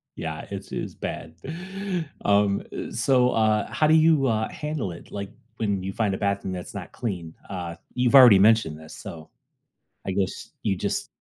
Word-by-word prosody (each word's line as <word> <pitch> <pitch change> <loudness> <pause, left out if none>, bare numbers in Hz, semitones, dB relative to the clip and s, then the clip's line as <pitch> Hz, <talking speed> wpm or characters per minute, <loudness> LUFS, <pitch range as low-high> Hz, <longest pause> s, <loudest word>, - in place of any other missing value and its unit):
Yeah, 80 -1 -5
it's 100 -1 -6
it's - - -4
bad. 80 0 -6 0.9
Um, 100 -1 +3
eh, - - -5
so, 125 +2 +3
uh, 110 -2 +2
how 155 - +2
do 155 - +5
you, 155 -4 +5
uh, 110 -1 0
handle 150 - -3
it? 85 - -11
Like 100 -1 -5 0.3
when 100 -4 0
you 95 +1 -4
find 105 -3 0
a - - -2
bathroom 100 -1 -1
that's 90 -1 -7
not - - -7
clean, 90 -8 -4 0.2
uh, 90 -3 -5 0.2
you've 125 +1 +2
already 125 -7 +10
mentioned 100 -7 +4
this, 80 0 -11
so 80 -1 -9 0.8
I 95 - -1
guess 95 0 -2
you 95 - 0
just - - -2
100 Hz, 175 wpm, -25 LUFS, 95-115 Hz, 0.9 s, already